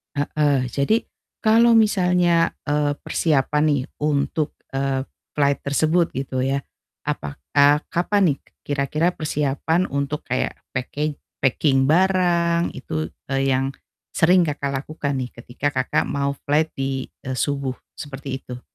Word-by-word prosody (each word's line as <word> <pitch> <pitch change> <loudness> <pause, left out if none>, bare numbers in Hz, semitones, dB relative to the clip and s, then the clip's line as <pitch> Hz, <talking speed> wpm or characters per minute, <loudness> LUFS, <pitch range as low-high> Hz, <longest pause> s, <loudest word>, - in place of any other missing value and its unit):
Heeh, 145 -2 +1
jadi 140 - +2 0.4
kalau 230 +2 +5
misalnya, 180 -6 +4 0.2
eee, 145 0 +1
persiapan 150 -1 +1
nih 145 -4 +2 0.2
untuk, 150 +1 0 0.2
eee, 135 0 -1 0.2
flight 140 -1 +2
tersebut 160 +4 +2
gitu 130 -1 -2
ya, 135 +1 +1 0.5
apakah 75 - +2
kapan 175 -3 +2
nih - - -24 0.2
kira-kira 150 +5 0
persiapan 155 +3 0
untuk 140 +2 -2
kayak 130 0 -1 0.2
packing 145 +4 -2 0.3
packing 135 0 +3
barang 175 -1 +2
itu, 155 -1 -3 0.2
eee, 135 0 +1
yang, 135 +1 +1 0.4
sering 180 +2 +4
Kakak, 140 -2 -2
lakukan 145 -3 -3
nih 125 -1 -4
ketika 125 +4 -3
Kakak, 130 -1 +1
mau 140 0 -1
flight 155 +2 +2
di, 135 -1 -2 0.2
eee, 130 - -2
subuh 140 0 -1 0.2
seperti 135 -2 -5
itu. 125 0 -8
145 Hz, 125 wpm, -22 LUFS, 135-160 Hz, 0.5 s, kalau